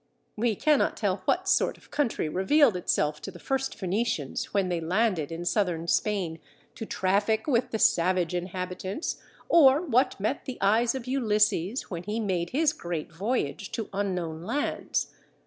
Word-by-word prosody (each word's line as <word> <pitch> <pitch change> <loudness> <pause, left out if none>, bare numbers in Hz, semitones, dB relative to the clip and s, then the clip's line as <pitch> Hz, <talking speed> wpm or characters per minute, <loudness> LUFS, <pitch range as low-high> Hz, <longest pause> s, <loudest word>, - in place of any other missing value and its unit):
We 225 0 +1
cannot 300 +5 +2
tell 200 -3 0
what 370 +1 +1
sort 380 - +2
of - - -22
country 285 - 0
revealed 220 - +3
itself 150 -4 0
to - - -6
the 185 - -10
first 270 +7 -2
Phoenicians 190 - -2
when 195 -2 +1
they 175 -2 -1
landed 180 -2 0
in 165 +1 -5
Southern 175 -4 0
Spain 180 -4 0 0.3
to 225 - -7
traffic 205 +4 +1
with 255 -3 +1
the 225 - -2
savage 180 -3 +2
inhabitants, 185 - -4 0.3
or 285 -4 +6
what 255 -4 +2
met 215 +8 -2
the 260 - -5
eyes 225 +5 +3
of 260 -3 -5
Ulysses 215 -5 +1
when 170 -2 -4
he 210 +5 -3
made 185 -5 -1
his 300 +2 +2
great 170 - -5
voyage 200 - -2
to 225 - -4
unknown 180 -5 -2
lands. 235 +11 -2
200 Hz, 160 wpm, -27 LUFS, 175-240 Hz, 0.3 s, or